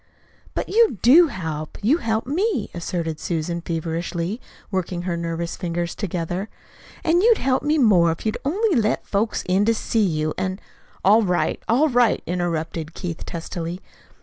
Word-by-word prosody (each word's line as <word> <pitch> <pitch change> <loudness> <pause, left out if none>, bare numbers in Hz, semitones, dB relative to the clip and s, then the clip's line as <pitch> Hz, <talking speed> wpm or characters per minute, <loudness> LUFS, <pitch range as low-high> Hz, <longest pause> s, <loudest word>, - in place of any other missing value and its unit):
"But - - -2
you 445 - +3
do 320 +8 +8
help. 160 - -5
You 265 +10 +4
help 225 -7 -1
me," 335 - -1
asserted 165 -2 -3
Susan 170 0 -2
feverishly, 170 +5 -3 0.3
working 180 -2 -2
her 180 -1 -1
nervous 170 0 -3
fingers 170 -1 -3
together. 180 +1 -3 0.5
"An' 340 +2 +3
you'd 455 +1 +5
help 260 0 +1
me 300 +2 +1
more 190 - +5
if 165 - -6
you'd 215 - -1
only 390 +6 +1
let 215 -1 +1
folks 215 +2 -1
in 185 +2 +3
to 230 +1 +3
see 225 - -1
you, 155 -5 0
an' 185 +1 -2 0.2
" - - -18
"All 210 +4 +6
right, 180 -4 0
all 260 +8 +4
right," 245 -3 +3
interrupted 165 -2 -3
Keith 175 -4 -5
testily. 170 0 -5
185 Hz, 160 wpm, -22 LUFS, 170-235 Hz, 0.5 s, do